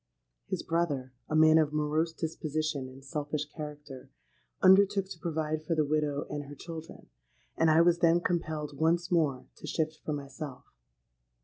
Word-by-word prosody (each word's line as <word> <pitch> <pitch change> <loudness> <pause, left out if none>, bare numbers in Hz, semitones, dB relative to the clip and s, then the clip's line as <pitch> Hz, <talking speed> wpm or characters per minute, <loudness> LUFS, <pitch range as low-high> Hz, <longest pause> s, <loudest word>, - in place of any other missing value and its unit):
His - - -3
brother—a 145 -5 -2
man 155 0 +7
of 155 -2 +2
morose 150 +2 +1
disposition 155 -4 -3
and 135 +1 -14
selfish 150 0 -3
character—undertook 155 +7 0
to 175 - -9
provide 155 -2 -2
for 165 +1 -1
the 155 -1 +2
widow 150 -1 0
and 145 -1 -5
her 145 +1 -10
children; 165 +2 -9 0.5
and 165 0 +3
I 155 +1 +6
was 170 0 +4
then 170 -1 +5
compelled 155 -5 -2
once 170 +2 +2
more 150 -7 +1
to - - -9
shift 155 -1 -1
for 155 - -2
myself. 140 -1 -7
155 Hz, 145 wpm, -30 LUFS, 145-165 Hz, 0.5 s, man